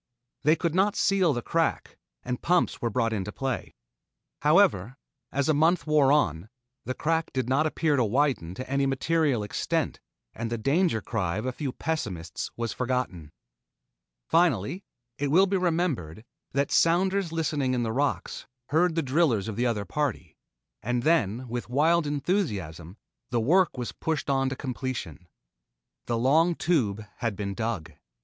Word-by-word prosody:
They 150 +3 +4
could 170 -2 -1
not 195 +3 +2
seal 190 -4 +3
the 120 -4 -2
crack, 165 -1 -1 0.3
and 125 0 -4
pumps 180 0 +1
were 120 - 0
brought 115 0 0
into 105 -1 -3
play. 135 - -4 0.7
However, 105 +7 +3 0.3
as 140 0 0
a 155 - +4
month 160 +2 +3
wore 150 -3 +4
on, 95 - +1 0.4
the 130 - -3
crack 165 0 0
did 130 -2 -1
not 140 +5 +2
appear 155 -1 +1
to 130 - +3
widen 115 - 0
to 130 - -6
any 140 +1 +1
material 140 -3 +1
extent 105 - -2 0.3
and 115 0 -4
the 115 - -2
danger 140 - +1
cry 95 -5 -2
of 110 - -3
a 130 - 0
few 135 +1 -4
pessimists 100 - -4
was 115 -1 -2
forgotten. 125 - -2 1.0
Finally, 165 - +2 0.4
it 145 0 0
will 180 +7 +5
be 195 0 -1
remembered, 160 - -1 0.3
that 140 +1 0
sounders 185 +1 +2
listening 150 -5 0
in 120 - 0
the 110 -1 -2
rocks 140 +3 -2 0.2
heard 165 +2 +2
the 165 - +1
drillers 130 - +2
of 110 - -4
the 120 +3 +1
other 105 -4 -1
party, 115 - -3 0.5
and 120 +3 -1
then 130 - +1
with 120 0 -5
wild 155 +5 +3
enthusiasm 105 - -2 0.3
the 120 - 0
work 170 +8 +3
was 120 -1 -3
pushed 155 -3 -2
on 135 -1 +1
to 135 - -4
completion. 125 - -5 0.8
The 120 - 0
long 160 +8 +3
Tube 110 - 0
had 115 -3 -2
been 100 0 -3
dug. 110 -8 -3
130 Hz, 160 wpm, -27 LUFS, 110-160 Hz, 1.0 s, will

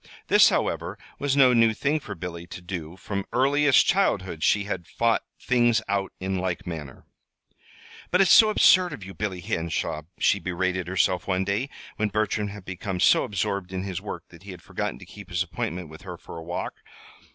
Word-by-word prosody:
This, - - +7
however, - - -1 0.2
was 140 -1 0
no 130 -2 +6
new 115 -2 +4
thing 145 +6 0
for 105 -8 -8
Billy 85 -1 -7
to 85 - -8
do 85 -1 -6
From 100 0 -4
earliest 140 +2 +4
childhood 95 - +1
she 100 +4 +3
had 95 -4 -5
fought 115 -1 +1 0.2
things 120 -2 +3
out 100 -1 -1
in 95 0 -2
like 90 -1 -3
manner. 75 -6 -7 1.0
"But 180 - +2
it's 190 -3 +5
so 220 - +8
absurd 185 -5 +5
of 120 - -8
you, 95 +1 -9
Billy 95 -4 -4
Henshaw," 80 -2 -2 0.2
she 100 - +3
berated 90 0 -2
herself 90 -1 +1
one 95 -1 +1
day, 100 +8 -1 0.3
when 110 -1 0
Bertram 105 0 0
had 100 -2 -9
become 95 0 -4
so - - +5
absorbed 100 -2 -2
in 95 0 -3
his 95 -3 -4
work - - -6
that 85 - -15
he 100 - -13
had 90 -3 -9
forgotten - - -4
to - - -12
keep 100 -3 -12
his 85 +1 0
appointment 90 0 -4
with 80 +1 -12
her - - -8
for - - -11
a 80 - -7
walk. 85 +2 -4
95 Hz, 195 wpm, -25 LUFS, 90-115 Hz, 1.0 s, so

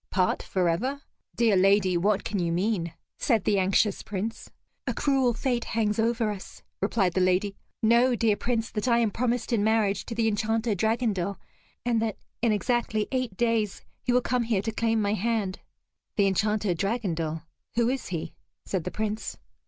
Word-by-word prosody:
"Part 185 -2 +1
forever? 195 +11 0 0.3
Dear 230 -4 +3
lady, 190 -1 +4
what 195 +3 +2
can 205 - -2
you 170 -1 0
mean?" 175 -2 0 0.3
said 225 -7 +2
the 200 -2 +2
anxious 195 +2 +2
Prince. 215 +3 -4 0.4
"A - - -1
cruel 265 -4 +2
fate 245 -1 0
hangs 215 -1 0
over 230 -1 +1
us," 195 -2 -9 0.2
replied 195 -3 +1
the 185 - +1
lady. 185 +2 +2 0.3
"Know, 240 +3 +5
dear 220 -2 +2
Prince, 230 0 -1
that 210 +3 -2
I 235 -1 +4
am 230 -3 +2
promised 240 +2 -1
in 210 -3 +2
marriage 215 -2 +2
to 230 - -4
the 225 -1 +2
Enchanter 220 +1 +1
Dragondel, 205 -2 0 0.5
and 235 -2 +2
that 225 -2 -1 0.2
in 230 -1 +3
exactly 215 0 0
eight 255 -7 -2
days, 230 -4 0 0.2
he 250 - 0
will 250 +1 +4
come 250 0 0
here 225 -4 0
to 225 - -1
claim 225 0 +1
my 200 0 +1
hand." 215 -2 -1 0.6
"The 200 - +3
Enchanter 210 0 +1
Dragondel 170 -6 -2 0.3
who 235 0 +3
is 260 +1 -1
he?" 170 -3 -4 0.3
said 185 -4 -2
the - - -1
Prince. 215 +2 -3
215 Hz, 175 wpm, -27 LUFS, 195-235 Hz, 0.6 s, Know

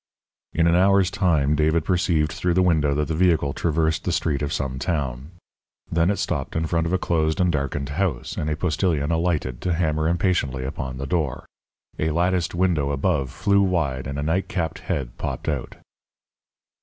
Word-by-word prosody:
In 85 - +2
an 85 0 +4
hour's 95 0 +4
time 85 -7 +2
David 80 +1 +2
perceived 85 -5 +1
through 90 -1 -1
the 95 - +4
window 75 -5 +2
that 75 0 0
the 80 - -2
vehicle 80 -4 +2
traversed 80 0 0
the 90 - -1
street 75 -4 0
of 70 0 -2
some 65 -3 -2
town. 70 -5 -2 0.6
Then 85 +1 +2
it 100 - +1
stopped - - -2
in 80 0 0
front 85 0 0
of 85 - -2
a - - +4
closed 80 -3 0
and 90 -1 +3
darkened 70 -2 -2
house, 75 -5 -2
and 75 - -2
a 75 - 0
postilion 80 -2 0
alighted 80 -7 -1
to 90 - 0
hammer 80 -2 0
impatiently 85 -7 0
upon 65 -1 -5
the 70 - -4
door. 75 -3 -1 0.5
A 80 - +1
latticed 85 +2 0
window 85 -6 +1
above 70 -1 0
flew 100 +8 +2
wide 80 -9 0
and 70 +1 -4
a 70 - -2
nightcapped 85 0 -1
head 65 -4 -3
popped - - -4
out. - - -2
80 Hz, 180 wpm, -23 LUFS, 70-90 Hz, 0.6 s, an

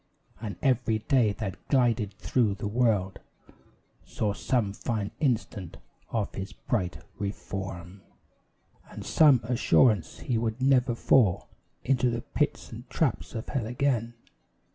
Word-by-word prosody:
And 105 -5 -4
every 125 -4 +2
day 115 -1 +2
that 100 -3 -6
glided 115 -6 +2
through 105 -1 +1
the 100 - -4
world 105 -4 +1 0.8
Saw 105 -2 -2
some 105 -2 0
fine 105 -2 -3
instance 110 - -1 0.3
of 110 -4 -2
his 95 +2 -6
bright 90 -7 -3 0.2
reform, 95 -2 -5 0.9
And - - -9
some 145 -6 +5
assurance 115 -5 +2
he 120 -3 0
would 115 +1 -2
never 130 -2 +3
fall 115 -6 +3 0.3
Into 125 -1 +2
the 120 0 -2
pits - - -2
and - - -10
traps - - -1
of 110 - -5
hell 125 -6 -2
again. 120 -2 0
115 Hz, 125 wpm, -28 LUFS, 100-125 Hz, 0.9 s, some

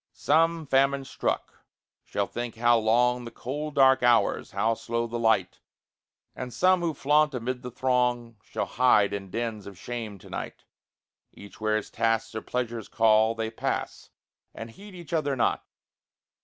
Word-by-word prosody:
Some, 165 +1 +2
famine 135 0 +2
struck, - - -3 0.4
shall 100 - -2
think 120 +2 -5
how 120 +1 +4
long 125 +3 +2
The 120 - -7
cold 145 +6 -5
dark 130 -1 +5
hours, 120 -1 +2
how 115 +1 +1
slow 115 +1 -3
the 120 0 -4
light; 110 -5 +1 0.8
And 125 -1 -6
some 185 +5 +3
who 165 -3 -1
flaunt 150 +1 +2
amid 125 +1 -3
the 125 - -6
throng 125 -2 0
Shall - - -4
hide 115 -6 +3
in 100 -1 -5
dens 110 -1 -4
of 100 -2 -10
shame 115 -1 -6
to - - -15
night. - - -6 0.7
Each 100 +1 -14
where 110 0 +2
his 110 - -6
tasks 115 0 0
or 110 - -4
pleasures 120 -3 -4
call, 110 0 +3
They 110 0 -3
pass, - - -4 0.5
and 115 0 -8
heed 200 - -13
each 170 -3 -10
other 145 -4 0
not. 120 - 0
120 Hz, 160 wpm, -27 LUFS, 110-135 Hz, 0.8 s, dark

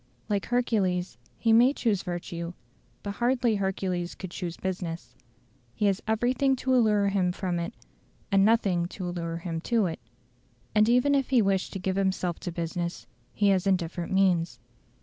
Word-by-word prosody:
Like 205 -2 -1
Hercules, 190 - 0 0.2
he 225 -1 +3
may 245 +4 +6
choose 215 -9 0
virtue, 175 -1 -5 0.5
but 205 - -3
hardly 240 0 +1
Hercules 185 -2 -2
could 185 -3 -8
choose 175 -2 -5
business. 170 -9 -4 0.6
He 210 - 0
has 195 -2 +2
everything 250 +5 +2
to 260 0 -1
allure 210 -5 +3
him 190 -2 +1
from 180 -1 -2
it, 170 +7 -4 0.6
and 195 0 +5
nothing 195 -6 +2
to 185 0 -6
allure 170 -1 -3
him 165 -1 -4
to 230 +1 +1
it. 165 -2 -3 0.7
And 215 +1 +4
even 250 +4 +4
if 275 -2 +1
he 250 -4 +4
wish 195 -1 +1
to - - -6
give 190 0 -2
himself 185 -3 0
to 175 - -5
business, 170 +1 -4 0.3
he 205 -1 +2
has 190 0 +2
indifferent 175 -2 -1
means. 185 -3 +2
190 Hz, 165 wpm, -27 LUFS, 175-220 Hz, 0.7 s, may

